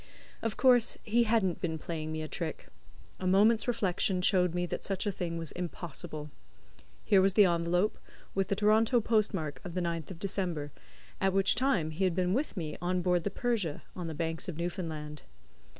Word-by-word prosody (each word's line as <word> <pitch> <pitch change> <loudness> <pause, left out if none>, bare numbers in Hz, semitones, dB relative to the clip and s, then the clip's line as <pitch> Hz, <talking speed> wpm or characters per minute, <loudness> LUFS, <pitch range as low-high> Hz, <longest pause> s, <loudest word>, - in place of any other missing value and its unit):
Of 225 -2 -2
course 245 -3 +4
he 235 +2 +2
hadn't 215 -6 +1
been 160 -2 -1
playing 155 -1 -5
me 155 0 -3
a - - -4
trick. 160 0 -5 0.5
A 185 - -2
moment's 215 +5 +4
reflection 190 -5 +1
showed 180 -3 +3
me 175 0 0
that 175 - -4
such 195 +1 -2
a 205 - +1
thing 170 -2 -4
was 165 -2 -5
impossible. 165 -3 -6 0.7
Here 195 - +5
was 190 0 +3
the 210 - +7
envelope, 175 +3 +1 0.3
with 195 -1 0
the 200 - 0
Toronto 215 +4 +4
post 215 -1 +2
mark 155 -7 -4
of 180 -2 -7
the 180 - 0
9th 170 -2 -3
of 185 - -7
December, 175 -6 -2 0.5
at 190 -1 +2
which 195 0 +4
time 220 - +1
he 165 +5 -2
had 180 -3 +1
been 180 0 +1
with 265 -2 -1
me 155 -4 -4
on 180 0 0
board 180 -1 +2
the 205 - 0
Persia, 205 - -1
on 175 -2 -4
the 160 - -5
Banks 165 +2 -3
of 165 - -5
Newfoundland. 160 -4 -4
180 Hz, 195 wpm, -31 LUFS, 165-205 Hz, 0.7 s, the